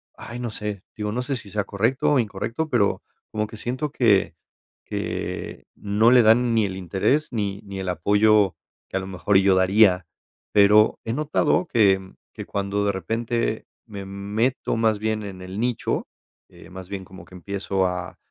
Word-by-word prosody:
ay, 120 Hz, +1 st, -8 dB
no 120 Hz, -2 st, -3 dB
sé, 105 Hz, -2 st, -5 dB
digo, 105 Hz, -1 st, -3 dB
no 125 Hz, -, -2 dB
sé 135 Hz, +2 st, -2 dB
si 110 Hz, -4 st, -9 dB
sea 105 Hz, 0 st, -1 dB
correcto 115 Hz, +8 st, +1 dB
o 140 Hz, -, +4 dB
incorrecto 115 Hz, +7 st, -3 dB
pero 100 Hz, -8 st, +1 dB, 0.3 s
como 105 Hz, 0 st, -2 dB
que 110 Hz, +1 st, -10 dB
siento 130 Hz, +6 st, -3 dB
que -, -, +2 dB, 0.5 s
que -, -, -4 dB
no 105 Hz, +4 st, +2 dB
le 125 Hz, -, +7 dB
dan 115 Hz, +2 st, +4 dB
ni 110 Hz, -2 st, +3 dB
el 95 Hz, -1 st, -4 dB
interés 95 Hz, -, 0 dB
ni 100 Hz, -2 st, -2 dB
ni 100 Hz, -1 st, -7 dB
el 95 Hz, -, -4 dB
apoyo 105 Hz, +2 st, +3 dB, 0.3 s
que 95 Hz, -, -2 dB
a -, -, 0 dB
lo 95 Hz, -, -6 dB
mejor 95 Hz, +1 st, +1 dB
yo 95 Hz, -1 st, +4 dB
daría. 95 Hz, -1 st, +4 dB, 0.5 s
Pero 105 Hz, +1 st, +5 dB
he 115 Hz, -, -2 dB
notado 155 Hz, +5 st, +1 dB
que 95 Hz, -4 st, +2 dB, 0.2 s
que -, -, -7 dB
cuando 100 Hz, +1 st, -2 dB
de 100 Hz, -, +2 dB
repente 115 Hz, +4 st, -2 dB, 0.2 s
me 100 Hz, -2 st, -7 dB
meto 105 Hz, +6 st, -1 dB
más 110 Hz, -2 st, +1 dB
bien 110 Hz, 0 st, -1 dB
en 95 Hz, -2 st, -8 dB
el 95 Hz, +4 st, -5 dB
nicho, 120 Hz, -1 st, -1 dB, 0.4 s
eh, -, -, -15 dB
más 95 Hz, 0 st, -10 dB
bien 95 Hz, -2 st, -5 dB
como 95 Hz, +1 st, -12 dB
que 90 Hz, -, -15 dB
empiezo 95 Hz, +1 st, -2 dB
a 90 Hz, 0 st, -5 dB
105 Hz, 180 wpm, -23 LUFS, 95-115 Hz, 0.5 s, le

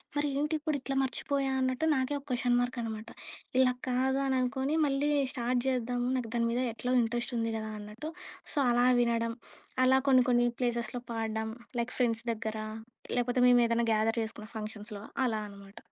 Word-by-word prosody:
మరి 290 Hz, 0 st, +1 dB
ఏంటి 300 Hz, +2 st, 0 dB
ఇప్పుడు 305 Hz, 0 st, -1 dB
ఇట్లా 270 Hz, 0 st, -3 dB
మర్చిపోయా 270 Hz, +2 st, -1 dB
అన్నట్టు 260 Hz, +4 st, 0 dB
నాకే 260 Hz, +1 st, 0 dB
ఒక 280 Hz, -, -19 dB
క్వెశ్చన్ 245 Hz, -1 st, +2 dB
మార్క్ 245 Hz, +1 st, -1 dB
అనమాట. 220 Hz, 0 st, -5 dB, 0.5 s
ఇలా 255 Hz, -1 st, +5 dB, 0.2 s
కాదు 265 Hz, +2 st, +2 dB
అని 265 Hz, -1 st, +1 dB
అనుకోని, 265 Hz, +4 st, 0 dB
మళ్ళీ 280 Hz, +1 st, +1 dB, 0.2 s
స్టార్ట్ 245 Hz, 0 st, 0 dB
చేద్దాము, 245 Hz, -1 st, 0 dB
నాకు 235 Hz, -3 st, -3 dB
దాని 235 Hz, 0 st, +2 dB
మీద 245 Hz, -, 0 dB
ఎట్లో 250 Hz, +2 st, -2 dB
ఇంట్రెస్టుంది 230 Hz, 0 st, -1 dB
కదా 220 Hz, 0 st, -4 dB
అన్నట్టు. 210 Hz, +9 st, -7 dB, 0.4 s
సో -, -, -4 dB
అలా 245 Hz, +1 st, +4 dB
వినడం. 230 Hz, -1 st, +1 dB, 0.5 s
అలా 265 Hz, +1 st, +5 dB
కొన్ని, 255 Hz, -1 st, +6 dB
కొన్ని 240 Hz, 0 st, +4 dB
ప్లేసెస్‌లో 240 Hz, -1 st, -1 dB
పాడడం 220 Hz, -1 st, -2 dB, 0.3 s
లైక్ 235 Hz, +1 st, -2 dB
ఫ్రెండ్స్ 230 Hz, -2 st, +1 dB
దగ్గర, 220 Hz, 0 st, -4 dB, 0.6 s
లేకపోతే 245 Hz, +1 st, +1 dB
మేము 245 Hz, -1 st, +6 dB
ఏదైనా 230 Hz, 0 st, +1 dB
గ్యాదర్ 225 Hz, +2 st, +1 dB
చేసుకున్న 220 Hz, -1 st, -7 dB
ఫంక్షన్స్‌లో 210 Hz, -1 st, -6 dB, 0.2 s
అలా 220 Hz, -3 st, 0 dB
అనమాట. 200 Hz, 0 st, -14 dB
245 Hz, 165 wpm, -30 LUFS, 225-260 Hz, 0.6 s, కొన్ని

